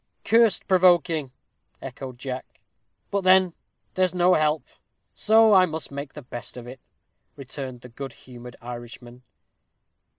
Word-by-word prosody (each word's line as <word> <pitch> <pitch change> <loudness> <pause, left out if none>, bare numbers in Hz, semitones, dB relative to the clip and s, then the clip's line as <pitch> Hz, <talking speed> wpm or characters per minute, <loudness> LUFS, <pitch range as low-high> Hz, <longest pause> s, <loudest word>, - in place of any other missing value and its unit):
"Cursed 225 -1 +3
provoking!" 175 -6 +3 0.5
echoed 130 -2 -8
Jack. 130 0 -7 0.5
"But 200 - 0
then 185 -1 +4 0.4
there's 185 -1 +1
no 180 +1 +4
help, 155 -3 +1 0.5
so 220 0 +5
I 185 -2 +6
must 160 -3 -6
make 140 0 -7
the 150 - -10
best 120 0 -8
of 120 - -8
it," 125 +1 -10 0.6
returned 130 -2 -7
the 125 - -12
good 135 +3 -8
humored 125 -1 -12
Irishman. 120 0 -9
145 Hz, 130 wpm, -24 LUFS, 125-185 Hz, 0.6 s, I